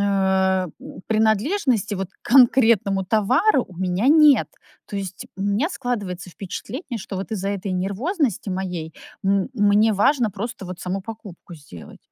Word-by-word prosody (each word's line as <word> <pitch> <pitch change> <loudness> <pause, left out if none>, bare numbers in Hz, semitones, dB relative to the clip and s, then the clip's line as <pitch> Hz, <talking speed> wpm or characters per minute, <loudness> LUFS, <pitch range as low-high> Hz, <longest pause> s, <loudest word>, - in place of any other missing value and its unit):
э, 190 -2 +2 0.4
принадлежности, 220 - +1
вот, 190 -1 -4
к - - -37
конкретному 230 -7 +5
товару 255 - +2
у 180 - -14
меня 185 +6 0
нет. 300 -2 +6 0.4
То 205 - -6
есть 195 -2 -6
у 195 - -5
меня 205 - +1
складывается 200 - -4
впечатление, 240 - -6
что 190 0 -7
вот 195 +4 -5
из-за 195 -2 -2
этой 200 -1 -4
нервозности 220 - -1
моей 180 -4 -4 0.3
м 195 +2 +1
мне 205 0 +3
важно 230 +2 +2
просто 205 +1 -6
вот 180 -1 -8
саму 185 +2 -3
покупку 200 -5 -10
сделать. 140 - -13
200 Hz, 145 wpm, -22 LUFS, 190-235 Hz, 0.4 s, нет